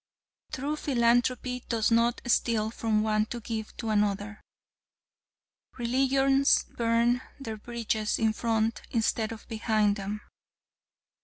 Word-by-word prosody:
True 285 Hz, +3 st, -2 dB
philanthropy 250 Hz, -1 st, +1 dB
does 230 Hz, -1 st, +1 dB
not 230 Hz, +1 st, +2 dB
steal 225 Hz, -2 st, +1 dB
from 220 Hz, -2 st, 0 dB
one 215 Hz, 0 st, +1 dB
to 240 Hz, -, -5 dB
give 220 Hz, -1 st, -5 dB
to 225 Hz, -, -4 dB
another. 210 Hz, 0 st, 0 dB, 1.4 s
Religions 270 Hz, +3 st, +3 dB
burn 235 Hz, +1 st, +2 dB, 0.2 s
their 225 Hz, -5 st, -5 dB
bridges 220 Hz, -1 st, -2 dB
in 220 Hz, -1 st, +2 dB
front 225 Hz, 0 st, 0 dB
instead 225 Hz, -1 st, 0 dB
of 225 Hz, -, -9 dB
behind 215 Hz, -2 st, +1 dB
them. 205 Hz, +2 st, -4 dB
230 Hz, 110 wpm, -28 LUFS, 215-240 Hz, 1.4 s, Religions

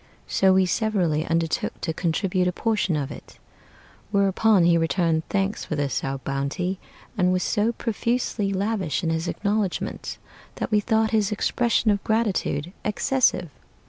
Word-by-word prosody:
So 190 Hz, -1 st, +3 dB
we 190 Hz, 0 st, +4 dB
severally 180 Hz, -6 st, 0 dB
undertook 165 Hz, -1 st, -1 dB
to 160 Hz, -, -2 dB
contribute 180 Hz, +2 st, 0 dB
a -, -, +2 dB
portion 210 Hz, -3 st, 0 dB
of 145 Hz, -1 st, -2 dB
it, -, -, -11 dB, 0.7 s
Whereupon 200 Hz, 0 st, +3 dB
he 170 Hz, 0 st, +5 dB
returned 165 Hz, -1 st, +1 dB
thanks 195 Hz, +1 st, -1 dB
for 155 Hz, -, -3 dB
this 145 Hz, -2 st, -1 dB
our 135 Hz, 0 st, -2 dB
bounty, 140 Hz, +8 st, -3 dB, 0.4 s
And 180 Hz, 0 st, +4 dB
was 185 Hz, 0 st, +1 dB
so 215 Hz, +3 st, +1 dB
profusely 230 Hz, -2 st, -1 dB
lavish 195 Hz, -5 st, -1 dB
in 165 Hz, -, 0 dB
his 165 Hz, +1 st, -1 dB
acknowledgments, 205 Hz, -1 st, -2 dB, 0.4 s
That -, -, -4 dB
we 210 Hz, -, +4 dB
thought 220 Hz, 0 st, +1 dB
his 215 Hz, -2 st, +2 dB
expression 230 Hz, +1 st, +1 dB
of 200 Hz, -1 st, -1 dB
gratitude 195 Hz, -7 st, 0 dB
excessive. 210 Hz, -, +1 dB
190 Hz, 145 wpm, -24 LUFS, 165-215 Hz, 0.7 s, he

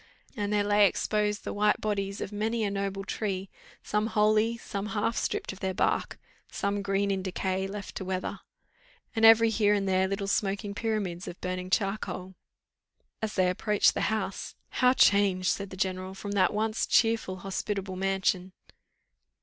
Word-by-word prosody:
And 205 Hz, -3 st, -2 dB
there 205 Hz, -1 st, +2 dB
lay 205 Hz, 0 st, +5 dB
exposed 210 Hz, +1 st, -1 dB
the -, -, -4 dB
white 210 Hz, 0 st, +2 dB
bodies 200 Hz, -2 st, -2 dB
of -, -, -4 dB
many 220 Hz, +2 st, -1 dB
a 205 Hz, -, 0 dB
noble 195 Hz, 0 st, -2 dB
tree, 195 Hz, -2 st, -3 dB, 0.3 s
some 210 Hz, +1 st, 0 dB
wholly, 215 Hz, +1 st, +2 dB
some 200 Hz, -2 st, -5 dB
half, 220 Hz, +1 st, -1 dB
stripped -, -, -2 dB
of 190 Hz, -, -13 dB
their 190 Hz, -1 st, -2 dB
bark, -, -, 0 dB, 0.3 s
some 200 Hz, 0 st, -1 dB
green 200 Hz, 0 st, 0 dB
in 190 Hz, -1 st, -1 dB
decay, 190 Hz, 0 st, -2 dB
left 200 Hz, 0 st, -7 dB
to -, -, -4 dB
the -, -, -8 dB
weather 185 Hz, -1 st, -3 dB, 0.8 s
and 225 Hz, -, 0 dB
every 225 Hz, 0 st, +7 dB
here 210 Hz, -1 st, +3 dB
and 195 Hz, -1 st, -1 dB
there 190 Hz, 0 st, +2 dB
little 195 Hz, +1 st, -2 dB
smoking 200 Hz, +1 st, -1 dB
pyramids 205 Hz, -5 st, -2 dB
of 175 Hz, -, -7 dB
burning 185 Hz, 0 st, -4 dB
charcoal. 195 Hz, -2 st, -1 dB, 0.9 s
As 220 Hz, -1 st, -3 dB
they 185 Hz, -2 st, +3 dB
approached 205 Hz, +3 st, +2 dB
the -, -, 0 dB
house 215 Hz, -3 st, -3 dB
"How 250 Hz, 0 st, +3 dB
changed," 200 Hz, -6 st, +4 dB
said 200 Hz, -1 st, -1 dB
the 190 Hz, -, -9 dB
general, 185 Hz, 0 st, -2 dB
"from 200 Hz, +1 st, -6 dB
that 190 Hz, -3 st, +3 dB
once 215 Hz, +1 st, -1 dB
cheerful 225 Hz, -4 st, +2 dB
hospitable 195 Hz, +1 st, -4 dB
mansion!" 190 Hz, -1 st, 0 dB
200 Hz, 170 wpm, -28 LUFS, 190-210 Hz, 0.9 s, every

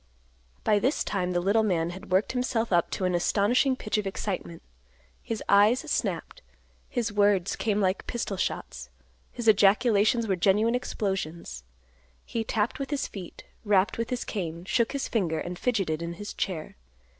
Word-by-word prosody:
By 210 Hz, -1 st, +3 dB
this 265 Hz, +8 st, +1 dB
time 185 Hz, -3 st, -1 dB
the 175 Hz, -1 st, +1 dB
little 200 Hz, +5 st, +3 dB
man 175 Hz, -5 st, 0 dB
had 190 Hz, +2 st, -10 dB
worked 190 Hz, +3 st, +2 dB
himself 240 Hz, -4 st, -1 dB
up 170 Hz, -1 st, +3 dB
to 190 Hz, -, -2 dB
an 180 Hz, -, +1 dB
astonishing 220 Hz, -, +2 dB
pitch 215 Hz, -3 st, -2 dB
of 205 Hz, -, -3 dB
excitement; 190 Hz, -4 st, -4 dB, 0.6 s
his 225 Hz, -2 st, -4 dB
eyes 205 Hz, +5 st, +5 dB
snapped; 320 Hz, +9 st, -3 dB, 0.5 s
his 230 Hz, -3 st, -2 dB
words 205 Hz, -3 st, +3 dB
came 210 Hz, -2 st, 0 dB
like 190 Hz, -1 st, 0 dB
pistol 235 Hz, -4 st, -3 dB
shots; 65 Hz, -, -4 dB, 0.4 s
his 240 Hz, -2 st, -5 dB
ejaculations 215 Hz, +2 st, +4 dB
were 195 Hz, -3 st, +1 dB
genuine 205 Hz, +6 st, +3 dB
explosions. 190 Hz, -, -3 dB, 0.6 s
He 230 Hz, -, -2 dB
tapped 220 Hz, +4 st, -1 dB
with 275 Hz, -, -3 dB
his 290 Hz, -2 st, -1 dB
feet; 185 Hz, -4 st, -9 dB, 0.2 s
rapped 205 Hz, 0 st, +2 dB
with 230 Hz, -, -2 dB
his 250 Hz, -1 st, -2 dB
cane; 170 Hz, -4 st, -4 dB
shook 230 Hz, +5 st, +1 dB
his 280 Hz, -, -2 dB
finger; 175 Hz, -8 st, 0 dB
and 175 Hz, +2 st, -5 dB
fidgeted 195 Hz, -10 st, 0 dB
in 170 Hz, 0 st, -4 dB
his 205 Hz, +4 st, -7 dB
chair. 165 Hz, -, -4 dB
205 Hz, 165 wpm, -27 LUFS, 180-230 Hz, 0.6 s, eyes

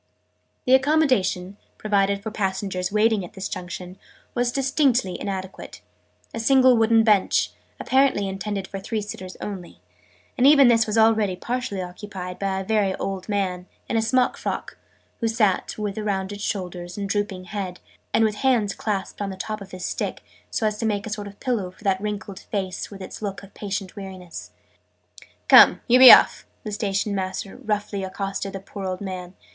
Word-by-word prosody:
The 255 Hz, -, +4 dB
accommodation, 260 Hz, -, +2 dB, 0.2 s
provided 200 Hz, -1 st, +1 dB
for 220 Hz, -, -4 dB
passengers 190 Hz, -2 st, -2 dB
waiting 215 Hz, -1 st, +2 dB
at 175 Hz, -, -10 dB
this 190 Hz, -1 st, -5 dB
Junction, 180 Hz, 0 st, -7 dB, 0.3 s
was 240 Hz, 0 st, 0 dB
distinctly 265 Hz, -, +1 dB
inadequate 190 Hz, -1 st, -6 dB, 0.5 s
a 230 Hz, -, -4 dB
single 260 Hz, +1 st, +5 dB
wooden 225 Hz, 0 st, +4 dB
bench, 210 Hz, -4 st, +3 dB, 0.3 s
apparently 260 Hz, -7 st, +2 dB
intended 195 Hz, 0 st, -4 dB
for 195 Hz, -, -6 dB
three 215 Hz, +2 st, -3 dB
sitters 190 Hz, -3 st, -8 dB
only: 185 Hz, -4 st, -7 dB, 0.6 s
and 255 Hz, -, +6 dB
even 280 Hz, -3 st, +7 dB
this 230 Hz, -2 st, +4 dB
was 215 Hz, +1 st, -1 dB
already 220 Hz, -4 st, +4 dB
partially 235 Hz, -2 st, -3 dB
occupied 180 Hz, 0 st, -7 dB
by 195 Hz, -1 st, -1 dB
a -, -, -4 dB
very 200 Hz, -2 st, +1 dB
old 195 Hz, 0 st, -5 dB
man, 185 Hz, -3 st, -1 dB, 0.2 s
in -, -, -2 dB
a 225 Hz, -, +3 dB
smock 250 Hz, +3 st, +2 dB
frock, -, -, -4 dB, 0.4 s
who 230 Hz, -, 0 dB
sat, 220 Hz, -4 st, +1 dB
with 210 Hz, -1 st, -3 dB
rounded 200 Hz, -1 st, -3 dB
shoulders 180 Hz, -3 st, -4 dB
and 200 Hz, -1 st, -3 dB
drooping 200 Hz, -2 st, -2 dB
head, 185 Hz, -1 st, -5 dB, 0.3 s
and 225 Hz, -, +3 dB
with 210 Hz, -1 st, -1 dB
hands 235 Hz, -7 st, +2 dB
clasped 205 Hz, -2 st, -3 dB
on 200 Hz, -, -2 dB
the 190 Hz, -, -7 dB
top 215 Hz, +2 st, -5 dB
of 195 Hz, -, -9 dB
his 185 Hz, -1 st, -6 dB
stick -, -, -3 dB, 0.3 s
so 220 Hz, -, -1 dB
as 210 Hz, -1 st, -1 dB
to -, -, -1 dB
make 205 Hz, -2 st, -1 dB
a 220 Hz, -, -6 dB
sort 205 Hz, -1 st, -4 dB
of 200 Hz, 0 st, -12 dB
pillow 230 Hz, -8 st, -1 dB
for 185 Hz, -, -19 dB
that 195 Hz, -2 st, +1 dB
wrinkled 205 Hz, -2 st, -5 dB
face 190 Hz, -3 st, -4 dB
with 195 Hz, -2 st, -10 dB
its 185 Hz, -, -9 dB
look 200 Hz, -2 st, -4 dB
of 200 Hz, -, -14 dB
patient 195 Hz, -2 st, -5 dB
weariness. 190 Hz, -4 st, -8 dB, 1.0 s
"Come, -, -, +8 dB
you 250 Hz, 0 st, +6 dB
be 255 Hz, -1 st, +12 dB
off!" -, -, +6 dB, 0.2 s
the 215 Hz, -, -5 dB
Station 205 Hz, -1 st, -1 dB
master 190 Hz, 0 st, -4 dB
roughly 205 Hz, -2 st, -2 dB
accosted 195 Hz, +1 st, -4 dB
the 195 Hz, -, -5 dB
poor 195 Hz, +1 st, -8 dB
old 185 Hz, -1 st, -3 dB
man. 185 Hz, -2 st, -6 dB
200 Hz, 175 wpm, -23 LUFS, 190-220 Hz, 1.0 s, be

